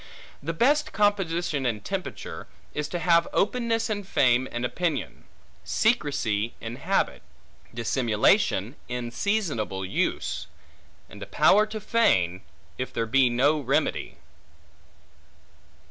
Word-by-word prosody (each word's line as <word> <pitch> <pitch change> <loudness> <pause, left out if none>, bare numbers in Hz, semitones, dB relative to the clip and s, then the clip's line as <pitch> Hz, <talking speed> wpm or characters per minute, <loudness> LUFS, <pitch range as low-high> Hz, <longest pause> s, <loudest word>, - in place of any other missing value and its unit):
The 160 - -3
best 295 - +2
composition 175 -8 +1
and 110 -5 -2
temperature, - - -5 0.3
is 150 0 -2
to 175 - -3
have 170 0 +3
openness 230 +1 +1
in 205 -2 -3
fame 130 -8 +2
and 120 +1 -2
opinion; 170 +4 -3 0.4
secrecy 115 - 0
in 115 +1 -6
habit; - - 0 0.5
dissimulation 115 - +1
in 120 -1 -4
seasonable 130 - -1
use; 95 - -2 0.6
and - - -13
a - - -6
power 210 +2 +4
to 215 0 -5
feign, 95 - +2 0.4
if 130 - -3
there 115 - -1
be 130 +2 +3
no 140 +6 +2
remedy. 140 - -1
145 Hz, 115 wpm, -26 LUFS, -, 0.6 s, power